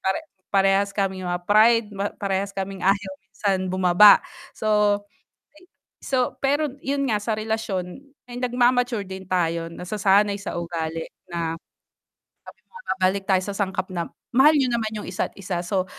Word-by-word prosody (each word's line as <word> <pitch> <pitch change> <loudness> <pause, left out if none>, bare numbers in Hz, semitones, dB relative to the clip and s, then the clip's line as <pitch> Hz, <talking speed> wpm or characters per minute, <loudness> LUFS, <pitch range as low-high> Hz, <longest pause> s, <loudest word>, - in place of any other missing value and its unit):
pare-parehas 195 -3 0
kaming 190 -2 -1
mga 175 0 -2
pride, 220 +3 +5 0.3
parehas 195 0 -2
kaming 195 -1 -5
ayaw 195 +1 +1
minsan 190 -1 -2
bumaba. 185 +2 +6 1.1
So, 295 -5 -5
pero 290 +1 +1
yun 275 -2 -1
nga 210 - +2
sa 215 +1 -2
relasyon 215 -4 -3 0.3
ay 245 - -6
nagma-mature 245 -2 +1
din 190 -1 -9
tayo 170 -2 0
nasasanay 200 +2 +1
sa 200 - -6
ugali 165 -1 -4 0.2
na 165 -2 -3 0.8
sabi - - -15
mo - - -44 0.2
babalik 190 +1 +1
tayo 185 -1 +3
sa 200 - -4
sangkap 190 -1 -2
na 170 -2 -3 0.2
mahal 280 +5 +6
niyo 260 -4 +2
naman 225 -2 0
yung 210 - -5
isa't 180 +3 -2
isa. 185 -3 -3
So 185 +1 -1
195 Hz, 140 wpm, -23 LUFS, 185-225 Hz, 1.1 s, bumaba